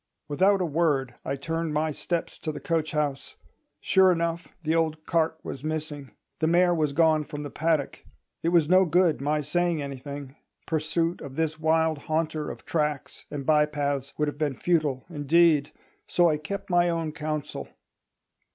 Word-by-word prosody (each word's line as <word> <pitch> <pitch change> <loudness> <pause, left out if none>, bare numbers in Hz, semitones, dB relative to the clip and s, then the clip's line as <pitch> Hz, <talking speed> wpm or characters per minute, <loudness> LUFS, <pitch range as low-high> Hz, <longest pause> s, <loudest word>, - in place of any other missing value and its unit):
Without 190 +6 +3
a - - +1
word 145 -6 +1
I 135 - -2
turned 165 +2 -3
my 155 +1 +1
steps 170 +3 -3
to 155 - -3
the - - -7
coach 160 -2 -1
house. 150 -3 -2 0.4
Sure 190 -1 +4
enough, 170 -1 -1 0.2
the 160 0 +1
old 160 -1 0
cart 160 -1 +1
was 135 - -7
missing; 155 -3 -4 0.3
the 160 - +2
mare 175 +1 +4
was 155 -4 +1
gone 155 0 +3
from 150 0 -7
the 145 - -6
paddock. 160 -3 -1 0.4
It 165 - +1
was 170 -3 +4
no 185 +3 +6
good 175 -3 +2
my 150 +2 +1
saying 170 +2 0
anything; 140 0 -7 0.3
pursuit 165 +2 -1
of 135 -2 -8
this 160 0 -1
wild 160 -1 +2
haunter 155 0 -2
of - - -9
tracks 150 -4 -2
and 140 -2 -5
by 150 0 +4
paths 140 -2 -2
would 150 - +1
have 145 0 -5
been 150 -3 0
futile 155 -6 0
indeed. 155 -1 +3 0.4
So 175 -2 +4
I 150 - 0
kept 195 +6 -6
my 175 0 +4
own 165 -2 -1
counsel. 155 -1 -4
155 Hz, 170 wpm, -26 LUFS, 145-165 Hz, 0.4 s, no